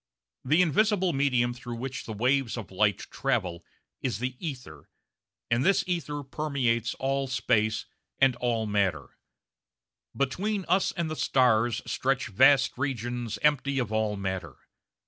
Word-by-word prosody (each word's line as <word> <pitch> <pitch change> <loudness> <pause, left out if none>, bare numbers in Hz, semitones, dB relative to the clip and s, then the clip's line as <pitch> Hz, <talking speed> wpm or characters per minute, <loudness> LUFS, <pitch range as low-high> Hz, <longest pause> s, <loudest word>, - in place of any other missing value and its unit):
The 155 +7 +4
invisible 190 +2 +2
medium 125 -3 +2
through 120 -1 -7
which 130 +2 -5
the 110 - -4
waves 125 +2 +1
of 105 -6 -7
light 100 0 +1
travel 85 -2 -1 0.4
is 130 - -1
the 125 +2 -3
ether, 125 - -7 0.6
and 120 +2 +3
this 195 +2 +3
ether 155 -5 -3
permeates 135 -5 -1
all 135 0 -1
space 110 -4 +1 0.3
and 135 -2 +4
all 120 -2 0
matter. 100 -8 0 1.1
Between 190 +9 -1
us 185 +3 +2
and 170 -4 -2
the - - -2
stars 120 -5 +2
stretch 135 -2 -1
vast 130 +5 +4
regions 120 -4 -3
empty 140 -2 +2
of 120 -5 -1
all 110 -1 0
matter. 95 -7 -4
125 Hz, 135 wpm, -27 LUFS, 110-140 Hz, 1.1 s, The